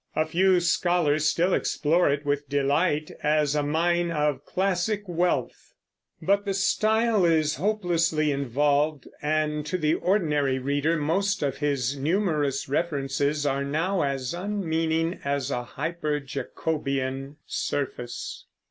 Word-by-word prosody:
A 155 - +2
few 180 +3 +3
scholars 170 -3 +2
still 175 +4 +1
explore 165 +3 +2
it 140 +1 -1
with 145 0 -1
delight, 145 +3 +1
as 150 -1 +2
a 150 - +1
mine 170 +4 +1
of 150 -3 0
classic 195 +2 0
wealth; 175 0 -1 0.4
but 200 +1 +2
the 200 -1 -2
style 215 +2 +2
is 155 -3 +2
hopelessly 170 -5 +1
involved, 145 +2 +1
and 150 0 0
to 185 - -1
the 155 -2 +1
ordinary 150 -9 +1
reader 145 +5 0
most 190 +6 0
of 140 -2 -1
his 140 -3 0
numerous 150 -2 0
references 145 -1 -1
are 140 0 0
now 165 +7 0
as 135 -2 -2
unmeaning 165 -3 -1
as 140 -1 -1
a 125 - -1
hyper 150 +4 -3
jacobian 135 0 -3
surface. 125 -4 -4
155 Hz, 125 wpm, -26 LUFS, 140-175 Hz, 0.4 s, few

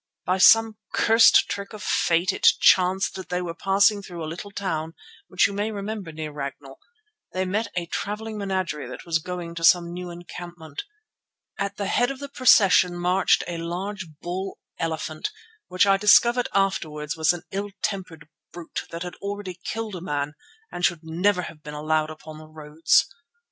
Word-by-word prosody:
"By 185 +1 +1
some 225 +2 +6 0.2
cursed 225 0 +6
trick 200 +1 -5
of 210 -2 -8
fate 170 +2 +2
it - - +2
chanced 185 +1 +4
that 190 - -8
when 180 - -1
they - - -1
were 170 -1 -4
passing 200 +3 +3
through 175 -3 -8
the - - -3
little 170 +6 -7
town 165 -5 -4 0.3
which 185 - +3
you 200 - -1
may 205 +2 -1
remember 205 -3 -5
near 155 -1 -6
Ragnall, 140 -1 -7 0.5
they 185 0 -1
met 210 +5 -1
a 175 -1 -1
travelling 215 +5 -4
menagerie 185 -6 -2
that - - -9
was 165 -2 +1
going 175 0 -6
to 165 0 -7
some 170 0 +4
new 180 0 -6
encampment. 175 -3 -9 0.7
At 200 0 -3
the 200 - -2
head 245 +5 +2
of 275 - -5
the 280 +1 -8
procession 195 -9 +5
marched 180 +2 +2
a 170 -1 -4
large 185 +3 -4
bull 185 +2 -5 0.2
elephant, 160 - -3 0.4
which 185 +2 +3
I 195 -1 +4
discovered 235 +5 +5
afterwards 155 -6 -1
was 160 -1 +3
an 175 -1 -6
ill 200 +1 -3
tempered 175 -6 -4 0.2
brute 170 -2 -6
that 170 +1 -5
had 180 - -6
already 200 -2 -6
killed 225 -2 -4
a 175 - -7
man 145 -3 -3 0.4
and 175 - -6
should 170 -3 +1
never 180 +4 +1
have 165 -2 -9
been 150 -1 -8
allowed 155 +1 0
upon 155 0 -10
the 155 - -12
roads. 155 +1 +2
180 Hz, 180 wpm, -24 LUFS, 160-200 Hz, 0.7 s, some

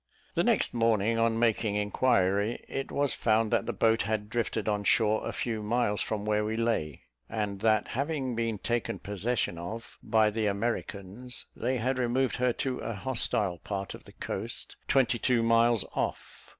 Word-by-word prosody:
The - - +2
next - - +2
morning, 115 -1 +2
on 115 0 +2
making 110 -2 +1
inquiry, 105 0 +1
it 135 - -4
was 140 -1 +1
found 110 -1 +2
that 115 -4 +1
the - - +1
boat 115 0 +3
had 105 0 -2
drifted 110 -3 -1
on 105 -1 0
shore 110 0 +3
a - - -2
few 115 -3 -2
miles 105 -1 0
from 105 -1 -2
where 105 0 +2
we 110 +1 -2
lay; 115 - -1 0.3
and 105 -3 -2
that 110 0 +2
having 140 -1 -1
been 115 -2 -1
taken 120 +3 -1
possession 105 -2 -2
of 110 +7 -7
by 110 -1 +3
the 110 0 0
Americans, 105 +2 -3
they 130 0 -1
had 130 +3 0
removed 125 +1 +1
her 125 0 +2
to 130 +1 -2
a 115 - -4
hostile 105 -6 0
part 100 +1 -4
of - - -11
the - - -14
coast, - - -4
twenty 130 -3 +3
two 120 -1 +2
miles 115 -1 +4
off. - - -4
115 Hz, 175 wpm, -29 LUFS, 105-120 Hz, 0.3 s, miles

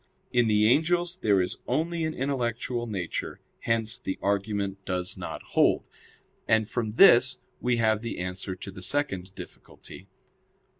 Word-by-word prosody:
In 120 -2 +3
the 105 -1 +3
angels 175 +7 +2
there 100 -3 +3
is 90 - -4
only 165 +1 -1
an 160 - -3
intellectual 120 -2 -2
nature; 95 -6 -4 0.2
hence 115 +1 -1
the 95 -6 -4
argument 100 -1 -1
does 90 -1 -2
not - - -7
hold. - - +3 0.6
And 110 -1 +3
from 110 -3 -3
this 130 - +6 0.2
we 125 -1 +1
have 110 -2 +2
the 115 - -5
answer 90 +1 -4
to 100 +2 -8
the 95 - -10
second 95 -5 -1
difficulty. - - -11
110 Hz, 145 wpm, -27 LUFS, 100-125 Hz, 0.6 s, this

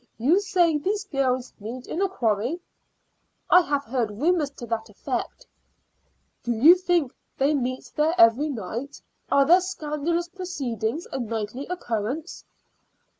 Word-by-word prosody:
You 290 - +3
say 360 -6 +2
these 405 +7 -1
girls 260 -8 -1
meet 235 +5 -7
in 355 - -3
a 390 - +2
quarry?" 240 - 0 0.9
"I 360 - +8
have 285 -4 -1
heard 235 -1 -1
rumors 295 - +1
to 275 -3 -10
that 230 -1 -3
effect." - - -5 1.0
"Do 240 - -1
you 280 +10 +8
think 350 -7 0 0.2
they 280 +3 +2
meet 255 -2 -3
there 310 +3 +2
every 245 +3 +5
night? 235 +2 -5 0.3
Are 280 0 +5
their 350 +5 +6
scandalous 335 -1 -2
proceedings 300 - -4
a - - -3
nightly 230 +2 -4
occurrence?" 280 - -4
280 Hz, 135 wpm, -25 LUFS, 235-345 Hz, 1.0 s, I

